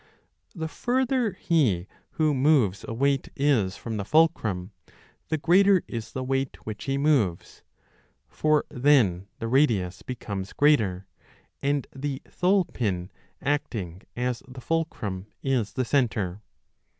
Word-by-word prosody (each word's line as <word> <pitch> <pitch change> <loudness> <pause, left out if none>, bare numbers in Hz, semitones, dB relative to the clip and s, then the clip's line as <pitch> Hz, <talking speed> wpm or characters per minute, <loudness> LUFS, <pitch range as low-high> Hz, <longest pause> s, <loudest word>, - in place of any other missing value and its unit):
The 160 -2 -3
further 245 +2 0
he 135 - +1 0.3
who 155 -2 +2
moves 130 -8 +3
a - - -4
weight 135 +3 +1
is 125 -9 +2
from 115 -2 -5
the 100 - -2
fulcrum, 110 - +2 0.6
the 160 - +1
greater 185 +4 +4
is 115 -2 -6
the 130 - -3
weight 135 0 -1
which 110 -1 -6
he 135 0 0
moves; 135 - +1 0.7
for 155 -1 +1
then 120 -9 +3
the 115 -4 -4
radius 115 -9 +2
becomes 100 -6 -5
greater, 110 -11 +3 0.6
and 140 -1 0
the 135 0 -3
thole 185 +1 +2
pin 95 -9 -3 0.3
acting 115 - -2
as 125 0 -2
the 130 0 -10
fulcrum 110 - -2 0.2
is 130 -6 0
the 130 - -1
centre. 105 -8 0
130 Hz, 125 wpm, -26 LUFS, 105-150 Hz, 0.7 s, greater